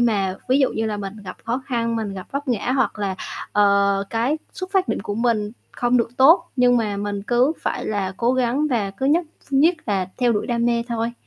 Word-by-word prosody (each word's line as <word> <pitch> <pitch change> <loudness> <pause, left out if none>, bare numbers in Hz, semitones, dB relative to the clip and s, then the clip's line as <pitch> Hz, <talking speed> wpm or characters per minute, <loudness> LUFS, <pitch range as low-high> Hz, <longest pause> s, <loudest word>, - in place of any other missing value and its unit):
mà 200 -6 +1
ví 260 - +4
dụ 270 - +3
như 225 - -1
là 210 -1 -2
mình 200 +1 -6
gặp 185 - -7
khó 240 +4 -2
khăn, 230 -3 -1
mình 210 -3 -3
gặp 185 - -7
vấp 280 0 -3
ngã 240 +1 0
hoặc 260 -5 0
là, 195 -2 -1 0.4
ờ, 200 -1 +3
cái 245 +7 0
xuất 370 0 -6
phát 380 -2 +2
điểm - - -1
của 205 - -4
mình 220 -2 0 0.2
không 245 +1 +1
được 230 -1 +1
tốt 325 +6 +6
nhưng 245 -1 +4
mà 210 -4 0
mình 205 0 -3
cứ 245 +7 +2
phải - - -2
là 200 -3 -1
cố 240 +1 +2
gắng 260 +4 +1
và 210 -5 0
cứ 205 +8 -3
nhất 330 +4 +3 0.2
ph - - -22
nhất 315 +6 +5
là 195 -4 0
theo 245 -2 +3
đuổi 205 - -1
đam 235 -1 0
mê 235 -1 +1
thôi. 230 0 -2
235 Hz, 235 wpm, -22 LUFS, 205-255 Hz, 0.4 s, tốt